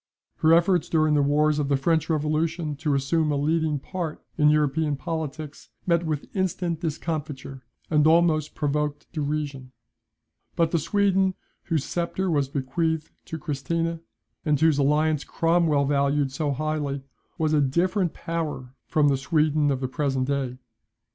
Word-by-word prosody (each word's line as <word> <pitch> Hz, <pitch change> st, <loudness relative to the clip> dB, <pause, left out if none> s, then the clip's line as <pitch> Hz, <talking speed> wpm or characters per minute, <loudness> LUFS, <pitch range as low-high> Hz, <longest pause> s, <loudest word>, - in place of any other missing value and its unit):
Her 160 Hz, -, +3 dB
efforts 175 Hz, -1 st, +2 dB
during 155 Hz, -2 st, +3 dB
the 145 Hz, -, +4 dB
wars 150 Hz, +1 st, +2 dB
of 140 Hz, -1 st, -1 dB
the 140 Hz, -, +3 dB
French 160 Hz, +3 st, +1 dB
revolution 155 Hz, +1 st, 0 dB
to 150 Hz, -1 st, 0 dB
assume 150 Hz, +3 st, +1 dB
a -, -, +1 dB
leading 155 Hz, +1 st, +1 dB
part 165 Hz, +2 st, -5 dB
in 150 Hz, -1 st, +4 dB
European 150 Hz, 0 st, +2 dB
politics, 155 Hz, -1 st, -5 dB, 0.2 s
met 170 Hz, -1 st, +1 dB
with 150 Hz, -2 st, -2 dB
instant 180 Hz, -3 st, -1 dB
discomfiture, 150 Hz, -4 st, -4 dB, 0.3 s
and 150 Hz, -1 st, +3 dB
almost 160 Hz, -2 st, +3 dB
provoked 150 Hz, 0 st, -1 dB
derision. 145 Hz, -4 st, -3 dB, 0.8 s
But 165 Hz, -1 st, +2 dB
the 170 Hz, -, +2 dB
Sweden, 195 Hz, +2 st, +2 dB, 0.3 s
whose 160 Hz, -5 st, 0 dB
sceptre 175 Hz, +2 st, -2 dB
was 140 Hz, -4 st, +1 dB
bequeathed 155 Hz, +4 st, -1 dB
to 160 Hz, -, -5 dB
Christina, 165 Hz, +2 st, -2 dB, 0.4 s
and 150 Hz, -3 st, +1 dB
whose 160 Hz, -2 st, +3 dB
alliance 150 Hz, +1 st, +2 dB
Cromwell 165 Hz, -4 st, +2 dB
valued 140 Hz, 0 st, +1 dB
so 145 Hz, +2 st, -1 dB
highly, 145 Hz, -1 st, -2 dB, 0.3 s
was 155 Hz, -1 st, +1 dB
a 150 Hz, -, +4 dB
different 175 Hz, +6 st, +1 dB
power 155 Hz, -6 st, -4 dB
from 150 Hz, -2 st, +3 dB
the 140 Hz, -1 st, +3 dB
Sweden 150 Hz, +1 st, +2 dB
of 135 Hz, -2 st, -1 dB
the 130 Hz, -, -1 dB
present 135 Hz, -1 st, -1 dB
day. 135 Hz, -3 st, -2 dB
155 Hz, 150 wpm, -25 LUFS, 145-165 Hz, 0.8 s, the